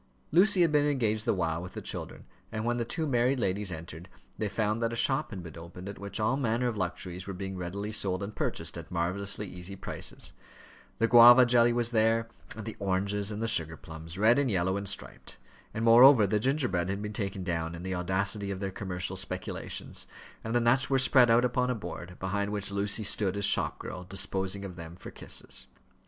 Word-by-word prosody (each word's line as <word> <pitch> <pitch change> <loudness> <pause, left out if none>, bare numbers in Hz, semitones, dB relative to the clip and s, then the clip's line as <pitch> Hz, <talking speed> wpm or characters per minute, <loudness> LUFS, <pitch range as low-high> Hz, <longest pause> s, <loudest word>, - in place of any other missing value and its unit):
Lucy 190 +3 +5
had 165 - +2
been 150 -1 +3
engaged 110 -7 0
the - - +2
while 85 -2 -1
with 90 - -9
the - - -5
children, - - -5 0.3
and 110 0 -3
when 120 0 0
the 120 - 0
two 160 +7 -2
married 125 -1 +1
ladies 100 -2 -1
entered, 80 +1 -8 0.3
they 105 -2 -2
found 110 +2 -1
that 115 0 0
a - - -4
shop 135 +5 +1
had 95 -5 -7
been 85 -3 -10
opened 90 +3 -10
at 100 - -7
which 100 +2 -5
all 110 +5 +1
manner 125 -2 0
of 120 - -2
luxuries 90 -1 -4
were 100 - -5
being 95 +1 -5
readily 95 +4 -4
sold 95 -3 -1
and 105 +2 -6
purchased 80 +1 -3
at 85 - -11
marvellously 95 +4 -1
easy 90 +1 -8
prices; - - -4 0.6
the 115 - +2
guava 120 +2 +9
jelly 120 0 +4
was 120 0 0
there, 115 0 +2 0.3
and 110 -1 -7
the 110 - -6
oranges, 100 +1 -1
and 105 +1 -4
the - - 0
sugar 80 -7 +2
plums, 80 +2 -10
red 110 +6 +5
and 140 -3 +1
yellow 95 -2 +1
and 100 -1 -1
striped; - - -5 0.3
and, 110 +1 -3
moreover, 120 0 +8
the 105 +2 +1
gingerbread 120 - 0
had 100 +2 -3
been 105 0 -5
taken 100 -3 -3
down 85 -2 -2
in 85 - -8
the 95 0 -3
audacity 95 +3 -1
of 95 -1 -4
their 95 -1 -3
commercial 95 -1 -4
speculations, 95 -1 -5 0.4
and 115 +1 -3
the - - +5
nuts 120 +3 +3
were 135 - +3
spread 130 -2 +5
out 120 +2 +5
upon 125 0 0
a 125 - 0
board, 90 -4 -8
behind 100 +2 -2
which 105 -1 -3
Lucy 100 +2 0
stood 100 -1 +1
as 100 - +1
shop - - +2
girl, 90 - -7
disposing 95 +1 -1
of 90 -2 -8
them 85 0 -8
for 90 - -10
kisses. - - -7
100 Hz, 215 wpm, -29 LUFS, 95-115 Hz, 0.6 s, guava